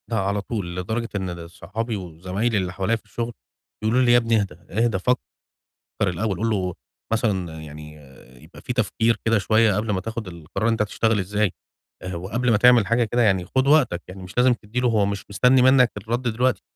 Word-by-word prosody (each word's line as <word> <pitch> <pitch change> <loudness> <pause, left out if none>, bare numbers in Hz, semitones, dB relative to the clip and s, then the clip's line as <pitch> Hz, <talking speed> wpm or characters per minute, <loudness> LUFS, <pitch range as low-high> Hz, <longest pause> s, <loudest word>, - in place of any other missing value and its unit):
لأ 115 -3 0
على 100 +1 -1
طول، 100 -5 -4
لدرجة 110 +6 -3
إن 95 -2 -2
ال 85 -1 -7
صحابي 115 +5 -4
وزمايلي 95 +5 -2
اللي 90 -2 -2
حواليَّ 100 +5 0
في - - -23
الشُّغل، 120 0 -4 0.5
بيقولوا 110 +4 +2
لي: 120 - +4
"يا 120 - +7
ابني 115 -2 +2
إهدا، 85 -4 -8
إهدا 110 +1 +1
فكر 125 +7 +1 0.8
الأول، 95 0 0
قُل 115 +3 0
له 95 -4 -1 0.4
مثلًا 95 -8 -1
يعني 75 0 -10 0.5
يبقى 80 +4 -14
في - - -4
تفكير 115 -1 +1
كده 115 -1 +3
شوية 110 0 +3
قبل 105 +1 -1
ما 95 -2 0
تاخد 110 0 -5
القرار 85 +5 -3
أنت 115 -2 +2
هتشتغل 110 +1 +1
إزاي، 100 +1 0 0.5
آآ، 90 0 -5
وقبل 110 +8 -1
ما 110 - +5
تعمل 120 -1 +6
حاجة 115 +3 +2
كده 120 +2 +1
يعني 95 -5 +2
خُد 130 +8 0
وقتك، 140 - +3
يعني 95 +1 -9
مش 90 -1 -11
لازم 125 +1 +5
تدي 115 +1 -4
له 125 - +2
هو 110 -3 +2
مش 100 0 -3
مستني 125 +5 +4
منك 130 -2 +5
الرد 115 +4 -3
دلوقتي." 120 -2 0
110 Hz, 200 wpm, -23 LUFS, 95-115 Hz, 0.8 s, يا